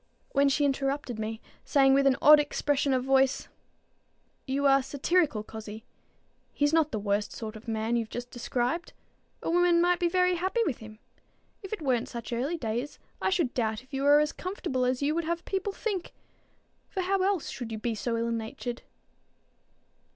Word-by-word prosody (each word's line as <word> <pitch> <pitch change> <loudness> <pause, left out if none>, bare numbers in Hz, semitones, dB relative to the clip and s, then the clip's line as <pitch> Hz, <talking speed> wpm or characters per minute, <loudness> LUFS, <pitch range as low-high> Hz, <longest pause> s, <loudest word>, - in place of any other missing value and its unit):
when 280 0 +3
she 290 +1 +2
interrupted 275 -3 -1
me, 220 0 -4 0.2
saying 270 -1 +4
with 275 0 +4
an 265 - +4
odd 300 +1 +9
expression 290 -1 0
of 255 -1 +1
voice, 270 0 +2 1.0
"You 275 +2 0
are 275 0 +5
satirical, 280 -2 +1
cozzie. 220 0 -9 0.7
He's 290 +1 +1
not 320 -2 +3
the 220 - -2
worst 205 0 -1
sort 220 -1 -6
of 215 +2 -12
man 225 +1 -1
you've 230 -2 -1
just 245 +2 -6
described. 245 +7 -2 0.5
A - - -2
woman 350 0 +4
might 355 +1 +3
be 345 - +2
very 360 0 +2
happy 380 +7 0
with 270 - -2
him. 215 -1 -11 0.6
If 390 - -9
it 425 -7 -4
weren't 250 -4 0
such 235 -1 -6
early 275 +9 -1
days, 240 +1 -3 0.2
I - - +2
should 345 -9 0
doubt 220 -1 -1
if 260 - -26
you 270 - -2
were 290 +1 +6
as 300 0 +1
comfortable 350 -9 -3
as 255 +2 0
you 295 +2 +2
would 335 0 -1
have 340 +1 -2
people 390 +1 -2
think; 390 -3 -4 0.8
for 380 - -2
how 385 +1 +1
else 385 -3 0
should 240 -3 -6
you 220 - -3
be 230 +2 -2
so 230 +2 -2
ill 230 0 -1
natured?" 230 +2 -4
270 Hz, 185 wpm, -28 LUFS, 235-335 Hz, 1.0 s, odd